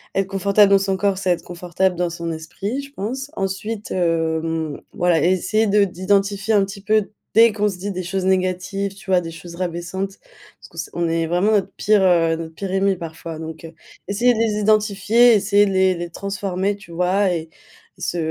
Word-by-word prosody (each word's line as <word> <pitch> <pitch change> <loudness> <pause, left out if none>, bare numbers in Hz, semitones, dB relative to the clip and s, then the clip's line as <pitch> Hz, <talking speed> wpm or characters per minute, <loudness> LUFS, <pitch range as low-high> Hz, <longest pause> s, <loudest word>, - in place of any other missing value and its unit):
être 195 -1 +1
confortable 200 +1 +3
dans 195 - +6
son 195 0 0
corps, 200 -1 +1
c'est 185 -2 +1
être 175 - -1
confortable 180 +1 -1
dans 175 -1 0
son 170 0 -4
esprit, 195 - -4
je 280 - -12
pense. 265 +7 -5
Ensuite, 200 +3 -4
hem, 165 -3 -1
voilà, 175 -2 +2
essayer 185 +5 +2
de 205 0 +4
d'identifier 195 +3 0
un 200 - +4
petit 195 0 -9
peu, 215 0 +1 0.3
dès 230 0 +7
qu'on 210 0 +1
se 190 - -6
dit 200 +2 -3
des 185 0 -4
choses 190 +1 -2
négatives, 190 +1 -1
tu 195 -1 -13
vois, 180 -1 +4
des 165 -1 -7
choses 170 +1 -10
rabaissantes, 185 +2 -4 0.4
parce - - -15
que - - -18
s - - -4
on 170 -1 -1
est 165 0 0
vraiment 180 +6 +2
notre 195 -2 +1
pire, 210 -2 +3
heu, 165 -3 +3
notre 165 -1 -7
pire 195 -2 -5
ennemi 195 0 +2
parfois, 165 -1 -7
donc, 160 0 -8
heu, 165 - -10 0.3
essayer 240 +5 +3
de 220 - -3
les 215 -2 +1
identifier, 215 +2 +4
essayer 205 0 +3
de - - -1
les 190 -1 +3
les 170 0 -5
transformer, 195 +1 -2
tu 200 -4 -15
vois? 180 +3 +1
Et 160 -1 -4 0.5
et - - -17
se 175 - -2
190 Hz, 205 wpm, -21 LUFS, 175-205 Hz, 0.5 s, dès